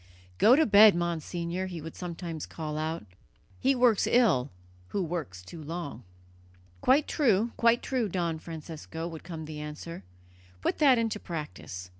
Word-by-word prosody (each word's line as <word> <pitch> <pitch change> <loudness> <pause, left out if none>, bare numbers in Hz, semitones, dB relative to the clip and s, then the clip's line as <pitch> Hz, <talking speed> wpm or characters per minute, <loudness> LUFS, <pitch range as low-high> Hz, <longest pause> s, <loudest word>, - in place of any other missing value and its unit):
"Go 235 +4 +7
to 315 +2 +4
bed, 210 -1 +8
Monsignor," 170 +1 -2
he 175 -3 -6
would 160 +1 -8
sometimes 170 -3 -5
call 155 -2 -5
out. 155 -4 -3 0.5
"He 270 +1 +3
works 245 -4 +4
ill 190 - +3 0.4
who 195 - -1
works 155 - -5
too 155 - -10
long." 160 -5 -6 0.8
"Quite 280 +3 +4
true, 230 -5 +2
quite 235 0 +3
true, 250 -5 -1
Don 170 -3 -1
Francesco," 160 0 -7
would 165 -2 -8
come 165 -3 -7
the 155 0 -7
answer; 150 -1 -7 0.6
"put - - 0
that 275 -5 +6
into 225 -2 -1
practice. 150 - -7
170 Hz, 150 wpm, -29 LUFS, 155-215 Hz, 0.8 s, bed